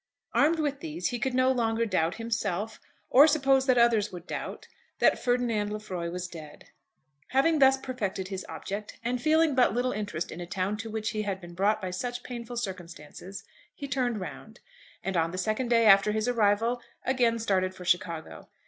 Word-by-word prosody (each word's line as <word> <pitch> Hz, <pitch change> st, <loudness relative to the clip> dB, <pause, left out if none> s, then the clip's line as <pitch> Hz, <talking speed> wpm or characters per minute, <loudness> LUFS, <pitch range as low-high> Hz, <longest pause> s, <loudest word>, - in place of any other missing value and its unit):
Armed 315 Hz, +3 st, +4 dB
with 290 Hz, -3 st, -1 dB
these 325 Hz, +2 st, -3 dB
he 245 Hz, -2 st, -3 dB
could 260 Hz, 0 st, -1 dB
no 255 Hz, 0 st, +4 dB
longer 230 Hz, -2 st, +1 dB
doubt 180 Hz, -5 st, 0 dB
himself, 220 Hz, -2 st, -3 dB, 0.3 s
or 280 Hz, +4 st, +8 dB
suppose 270 Hz, -3 st, +3 dB
that 255 Hz, -1 st, +4 dB
others 230 Hz, -3 st, +3 dB
would 175 Hz, -1 st, -9 dB
doubt, -, -, -6 dB, 0.3 s
that -, -, +3 dB
Ferdinand 235 Hz, -4 st, 0 dB
Lefroy 190 Hz, -5 st, -4 dB
was 180 Hz, +1 st, -4 dB
dead. 155 Hz, -4 st, -12 dB, 0.6 s
Having 300 Hz, +4 st, +2 dB
thus 270 Hz, -1 st, +6 dB
perfected 205 Hz, -8 st, -4 dB
his 190 Hz, -1 st, -4 dB
object, 205 Hz, +2 st, -6 dB
and 245 Hz, +1 st, -1 dB
feeling 315 Hz, +1 st, +3 dB
but 250 Hz, -4 st, +3 dB
little 250 Hz, +1 st, +1 dB
interest 200 Hz, -6 st, -4 dB
in 170 Hz, -, -7 dB
a 175 Hz, -, -6 dB
town 185 Hz, +3 st, -1 dB
to 225 Hz, +1 st, -6 dB
which 220 Hz, 0 st, -2 dB
he 215 Hz, -1 st, -2 dB
had 200 Hz, -2 st, -3 dB
been 175 Hz, -2 st, -11 dB
brought 205 Hz, +4 st, +2 dB
by 185 Hz, -3 st, -4 dB
such 245 Hz, +6 st, -4 dB
painful 240 Hz, -1 st, -7 dB
circumstances, 185 Hz, -2 st, -7 dB, 0.3 s
he 280 Hz, -, -6 dB
turned 250 Hz, -4 st, -1 dB
round, 220 Hz, +4 st, -8 dB, 0.4 s
and 195 Hz, -1 st, -2 dB
on 165 Hz, -1 st, +2 dB
the 185 Hz, -, -6 dB
second 215 Hz, +6 st, -1 dB
day 230 Hz, -1 st, +4 dB
after 200 Hz, 0 st, +6 dB
his 220 Hz, +2 st, -1 dB
arrival, 230 Hz, +1 st, +2 dB, 0.2 s
again 245 Hz, -3 st, +2 dB
started 190 Hz, -4 st, 0 dB
for 180 Hz, -, -10 dB
Chicago. 170 Hz, -3 st, -2 dB
220 Hz, 185 wpm, -28 LUFS, 190-250 Hz, 0.6 s, or